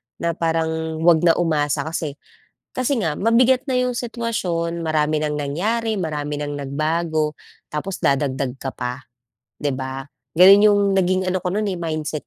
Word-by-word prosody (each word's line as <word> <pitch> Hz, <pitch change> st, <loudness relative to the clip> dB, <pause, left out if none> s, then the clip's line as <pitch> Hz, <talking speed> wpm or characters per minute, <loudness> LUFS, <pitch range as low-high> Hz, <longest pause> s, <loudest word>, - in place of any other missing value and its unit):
Na 170 Hz, -, -1 dB
parang, 160 Hz, -1 st, -2 dB
'wag 170 Hz, -1 st, +6 dB
na 165 Hz, -, +6 dB
umasa 150 Hz, -4 st, 0 dB
kasi, 160 Hz, -3 st, -4 dB, 0.6 s
kasi 255 Hz, 0 st, +1 dB
nga 160 Hz, -5 st, -1 dB
mabigat 250 Hz, +4 st, +4 dB
na 265 Hz, -, -1 dB
yung 250 Hz, -1 st, 0 dB
sitwasyon, 180 Hz, -9 st, -2 dB
marami 155 Hz, -1 st, +1 dB
nang 150 Hz, -1 st, -1 dB
nangyari, 215 Hz, +11 st, -1 dB
marami 150 Hz, -3 st, -3 dB
nang 145 Hz, 0 st, -3 dB
nagbago, 155 Hz, +2 st, -1 dB, 0.4 s
tapos 180 Hz, +6 st, -3 dB
dadagdag 135 Hz, -2 st, 0 dB
ka 135 Hz, -, -2 dB
pa, 125 Hz, +2 st, -4 dB, 0.6 s
'di 145 Hz, -, -1 dB
ba? 130 Hz, 0 st, -5 dB, 0.3 s
Ganon, 195 Hz, +3 st, +9 dB
yung 205 Hz, -1 st, +4 dB, 0.2 s
naging 185 Hz, 0 st, +1 dB
ano 185 Hz, -, 0 dB
ko -, -, -1 dB
no'n, 215 Hz, +1 st, 0 dB
eh, 185 Hz, -, -4 dB
mindset 155 Hz, -2 st, -3 dB
160 Hz, 155 wpm, -21 LUFS, 150-190 Hz, 0.6 s, Ganon